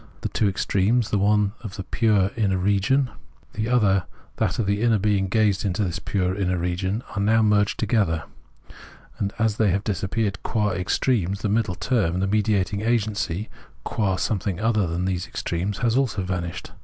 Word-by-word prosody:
The - - -2
two 105 - +1
extremes, 105 +4 +1
the 105 - +2
one 105 0 +3
that - - -14
of 100 - -6
the 95 - -5
pure 105 -2 +2
inner 100 -5 +1
region, 100 +8 +2 0.4
the 110 +2 -2
other 100 -7 +3 0.3
that - - 0
of 115 - 0
the 100 +2 0
inner 115 -2 +3
being 100 -1 +1
gazing 100 -1 +2
into 95 +3 -1
this 90 -2 -2
pure 95 -2 -1
inner 95 -2 0
region, 95 +6 -2
are 100 - 0
now 110 +2 +3
merged 105 -1 +2
together; 100 -9 +1 1.0
and 100 -1 -1
as 110 -2 +1
they 110 -2 +3
have 100 +2 0
disappeared 100 0 -2
qua 105 -2 0
extremes, 95 +2 0
the 105 - -1
middle 105 -3 +1
term, 95 -6 0
the 95 - +1
mediating 105 -1 +1
agency, 110 -4 -1 0.4
qua 100 -5 0
something 95 -2 -1
other 110 -4 +1
than 85 +2 -2
these 90 -2 -2
extremes, 90 +4 -3
has 115 0 +2
also 125 -7 +1
vanished. 90 -2 -4
100 Hz, 180 wpm, -24 LUFS, 95-110 Hz, 1.0 s, one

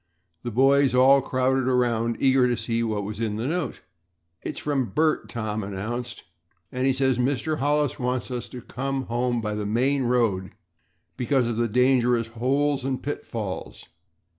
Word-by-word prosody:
The 120 - -4
boys 135 +2 +4
all 135 +2 +6
crowded 130 0 0
around, 120 -2 +1
eager 130 -1 +4
to 120 -1 0
see 115 +1 -1
what 110 -3 -1
was 105 +1 -6
in 110 -2 -1
the 110 +3 -3
note. 160 -3 -2 0.6
"It's - - -5
from 140 -3 0
Bert," 155 +9 +1
Tom 110 -2 -3
announced, 110 +5 -5 0.5
"and 130 +1 0
he - - +4
says 130 -1 +1
that - - +1
Mr. 145 +4 -1
Hollis 145 -1 +1
wants 125 0 -2
us 125 -1 -4
to 125 -2 -9
come 135 +1 -3
home 120 0 -1
by 105 -1 -2
the 105 -1 -3
main 130 +5 +1
road 115 -7 +1 0.6
because 125 -1 +1
of 115 -2 -2
the 120 0 +1
dangerous 125 0 +3
holes 135 +4 0
and 130 -1 -2
pitfalls. 110 -8 -5
125 Hz, 165 wpm, -25 LUFS, 115-135 Hz, 0.6 s, all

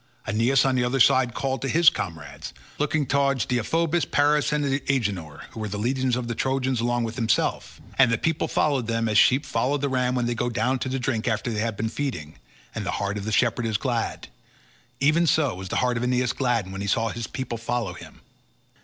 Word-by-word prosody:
Aeneas 115 +6 +2
on 135 - +2
the 125 -1 +1
other 125 +2 0
side 125 -1 +4
called 135 -1 -2
to 135 - -2
his 165 +2 +6
comrades, 80 -4 -6 0.3
looking 150 0 +1
towards 140 -1 +1
Deiphobus, 165 +7 0
Paris, 145 +1 +2
and 150 -1 0 0.2
Agenor, 100 - -1
who - - -9
were 110 - -3
leaders 125 +5 0
of 125 -1 -3
the 120 - -2
Trojans 130 +1 -1
along 120 0 0
with 115 +1 -4
himself, 115 -3 0 0.2
and 130 -4 +6
the 115 - +2
people 160 -1 0
followed 135 -6 0
them 115 0 0
as 105 -1 +4
sheep 135 +4 +4
follow 140 +3 0
the 140 0 -1
ram 125 -1 0
when 125 -1 0
they 120 - 0
go 120 +1 -1
down 125 +2 0
to 130 - -3
drink 125 -3 -2
after 110 +1 -1
they 105 - -2
have 115 -2 -2
been 110 - -1
feeding, 110 - -5 0.3
and - - -4
the - - -3
heart 100 0 -2
of 100 - -7
the 110 - -2
shepherd 120 +1 +1
is 110 -2 0
glad—even 130 +5 -2
so 155 -2 +2
was 95 +1 -8
the - - -3
heart 125 -1 0
of 115 - -2
Aeneas 125 -1 +1
gladdened 120 -7 0
when 95 - -5
he 100 - -3
saw 115 +3 +1
his 115 -1 -5
people 125 -4 -5
follow 115 -4 -2
him. - - -13
120 Hz, 215 wpm, -25 LUFS, 110-135 Hz, 0.3 s, his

